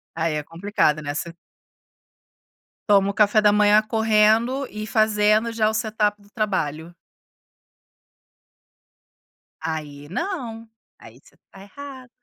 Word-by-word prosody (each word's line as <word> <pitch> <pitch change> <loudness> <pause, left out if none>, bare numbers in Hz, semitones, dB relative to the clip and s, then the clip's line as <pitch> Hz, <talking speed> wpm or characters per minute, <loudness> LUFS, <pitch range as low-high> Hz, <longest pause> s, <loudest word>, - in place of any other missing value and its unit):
Aí 165 -1 -1
é 150 - -2
complicado, 165 -2 0
né, 145 0 -4
você 170 +2 -5 1.6
toma 200 -1 +4
o - - -3
café 210 +1 +3
da 210 0 +5
manhã 210 +1 +4
correndo 220 +4 +2
e 215 0 -6
fazendo 215 +1 +2
já 220 -1 +1
o 220 - -2
setup 210 -2 -1
do 205 - -22
trabalho. 170 -7 -3 2.7
Aí 150 -3 -6
não, 230 - -5 0.3
aí - - -15
você - - -24
está 195 - -18
errada. 260 +4 -11
210 Hz, 120 wpm, -22 LUFS, 170-220 Hz, 2.7 s, da